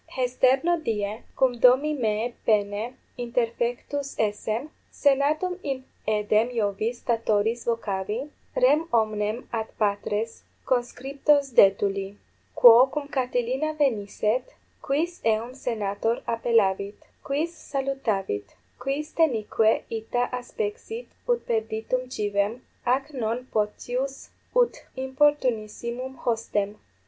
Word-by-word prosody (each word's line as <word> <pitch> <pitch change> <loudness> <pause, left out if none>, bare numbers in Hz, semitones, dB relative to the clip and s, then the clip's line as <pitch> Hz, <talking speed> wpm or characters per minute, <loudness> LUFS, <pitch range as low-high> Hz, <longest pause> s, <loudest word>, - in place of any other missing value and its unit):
Hesterno 260 +6 +2
die, 210 -2 -2 0.2
cum 250 -2 +2
domi 260 +5 +5
meae 230 -3 -1
paene 210 +3 +1 0.2
interfectus 240 +3 -2
essem, 220 +6 -1 0.2
senatum 300 +6 +2
in 270 -2 -3 0.2
aedem 215 +2 +2
Iovis 220 0 -1
Statoris 225 0 +1
vocavi, 225 +3 -2 0.2
rem 335 -11 +4
omnem 215 0 0
ad 220 -1 -1
patres 210 +1 -1 0.2
conscriptos 275 +3 +1
detuli: 195 -1 +3 0.4
quo 240 +2 +9
cum 285 +1 -4
Catilina 260 +3 -1
venisset, 230 -3 0 0.3
quis 325 +6 -1
eum 225 +2 +1
senator 225 -2 -2
appellavit? 210 -4 +1 0.3
quis 300 +5 -1
salutavit? 255 - -2 0.2
quis 275 +4 -3
denique 225 -7 +2
ita 230 +2 -1
aspexit 435 - -5 0.2
ut 480 -1 +1
perditum 225 +3 -1
civem, 205 +2 -1 0.2
ac 270 +4 +1
non 240 -1 -2
potius 245 +5 -2 0.3
ut - - +3 0.2
importunissimum 260 -2 0
hostem? 220 -4 -1
240 Hz, 95 wpm, -26 LUFS, 215-275 Hz, 0.4 s, quo